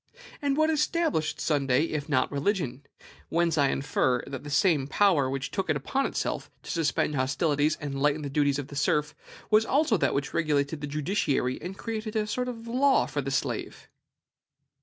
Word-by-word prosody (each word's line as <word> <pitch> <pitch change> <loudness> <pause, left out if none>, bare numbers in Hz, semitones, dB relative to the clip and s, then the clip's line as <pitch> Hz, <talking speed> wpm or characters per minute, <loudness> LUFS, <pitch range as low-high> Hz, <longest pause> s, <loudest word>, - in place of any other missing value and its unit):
And 280 -1 0
what 310 +1 +3
established 305 - 0
Sunday, 140 -2 +2
if 155 -2 -3
not 130 -3 +1
religion? 145 - -1 0.5
Whence 170 0 +1
I 140 -3 +3
infer, 130 -3 0
that 135 -2 -7
the 145 - -7
same 145 -2 +2
power 150 -4 +3
which 135 0 -3
took 195 -4 -2
it 155 - +3
upon 265 - -1
itself - - -3
to - - -6
suspend 160 -2 0
hostilities 145 +2 +1
and 145 -2 -4
to 135 - -4
lighten 150 +2 +1
the - - -3
duties 145 -1 +2
of 145 -1 -5
the 145 - -9
serf 150 +1 +1 0.4
was 215 +1 +6
also 270 -2 +2
that - - +1
which 140 +1 -2
regulated 150 -2 0
the 145 - -3
judiciary 145 -4 -1
and 190 +2 -6
created 220 -1 -4
a 215 -1 +1
sort 250 +4 -2
of 230 -2 -6
law 265 +3 +3
for 145 - -3
the 135 - -4
slave. 135 - -3
150 Hz, 185 wpm, -27 LUFS, 140-210 Hz, 0.5 s, was